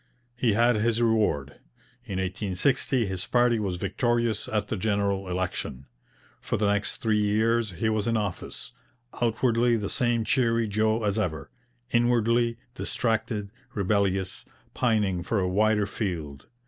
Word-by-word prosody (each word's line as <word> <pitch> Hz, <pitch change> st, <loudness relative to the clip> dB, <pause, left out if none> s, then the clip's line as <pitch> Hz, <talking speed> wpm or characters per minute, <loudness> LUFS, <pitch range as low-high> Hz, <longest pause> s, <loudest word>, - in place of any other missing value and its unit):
He 120 Hz, -3 st, +2 dB
had 120 Hz, +2 st, +3 dB
his 115 Hz, +1 st, +1 dB
reward. 110 Hz, -12 st, +1 dB, 0.5 s
In 100 Hz, -6 st, -4 dB
1860 100 Hz, +7 st, 0 dB
his 95 Hz, -2 st, -4 dB
party 120 Hz, -2 st, +3 dB
was 95 Hz, -4 st, -2 dB
victorious 115 Hz, +3 st, 0 dB
at 105 Hz, -1 st, -1 dB
the -, -, -2 dB
general 100 Hz, -2 st, 0 dB
election. 90 Hz, -7 st, -3 dB, 0.5 s
For -, -, -2 dB
the 100 Hz, -1 st, +2 dB
next 100 Hz, 0 st, -1 dB
three 110 Hz, -2 st, +1 dB
years 110 Hz, +1 st, +1 dB
he 90 Hz, +7 st, -1 dB
was 110 Hz, -1 st, 0 dB
in 115 Hz, -1 st, +2 dB
office, 100 Hz, +1 st, -4 dB, 0.5 s
outwardly 120 Hz, 0 st, +2 dB
the 105 Hz, -2 st, -3 dB
same 120 Hz, -2 st, +1 dB
cheery 115 Hz, -3 st, +2 dB
Joe 110 Hz, +2 st, +1 dB
as 105 Hz, +1 st, 0 dB
ever, 85 Hz, -7 st, -3 dB, 0.4 s
inwardly 120 Hz, 0 st, +2 dB, 0.2 s
distracted, 110 Hz, -5 st, -2 dB, 0.2 s
rebellious, 95 Hz, -2 st, 0 dB, 0.3 s
pining 105 Hz, -7 st, +1 dB
for 100 Hz, +5 st, -1 dB
a 90 Hz, -, +1 dB
wider 105 Hz, +2 st, +2 dB
field. 85 Hz, -9 st, -4 dB
110 Hz, 135 wpm, -26 LUFS, 100-115 Hz, 0.5 s, had